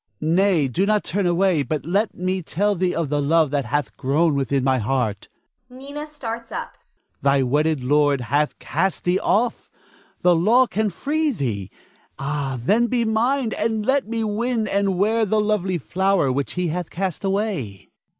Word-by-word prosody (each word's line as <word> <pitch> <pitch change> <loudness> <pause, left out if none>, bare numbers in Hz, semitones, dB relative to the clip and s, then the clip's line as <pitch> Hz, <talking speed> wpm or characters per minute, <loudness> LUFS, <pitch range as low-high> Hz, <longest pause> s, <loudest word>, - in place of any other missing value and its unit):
Nay, 170 -1 +2
do 185 +10 0
not 210 -1 +2
turn 195 +2 -1
away, 175 -2 +2
but 150 +1 -3
let 200 +6 0
me 185 +1 -2
tell 205 +5 0
thee 180 -1 -1
of 165 -4 -1
the 145 0 0
love 155 0 +2
that 140 -3 0
hath 145 +3 -2
grown 150 +5 +2
within 135 -1 0
my 130 -1 +2
heart. 110 -3 -1 0.4
[Nina 280 +4 -8
starts 235 -6 -6
up.] - - -5 0.5
Thy 140 -1 +3
wedded 150 +2 +1
lord 145 0 +2
hath 145 +5 0
cast 180 +6 -1
thee 180 +1 +2
off. 230 +3 0 0.5
The 180 -1 +5
law 225 +10 +4
can 220 -2 -1
free 300 - -1
thee. 115 - -3 0.5
Ah, 140 -1 -3
then 215 - +2
be 240 -1 0
mine, 230 +2 +1
and 220 -2 -1
let 270 -2 +1
me 225 0 -2
win 220 +1 -1
and 195 -2 0
wear 220 +4 +2
the 215 +1 +1
lovely 205 -4 0
flower 190 -2 +1
which 140 +2 -2
he 180 -1 -1
hath 175 +1 -3
cast 185 -1 -3
away. 190 - -2
180 Hz, 170 wpm, -22 LUFS, 145-215 Hz, 0.5 s, The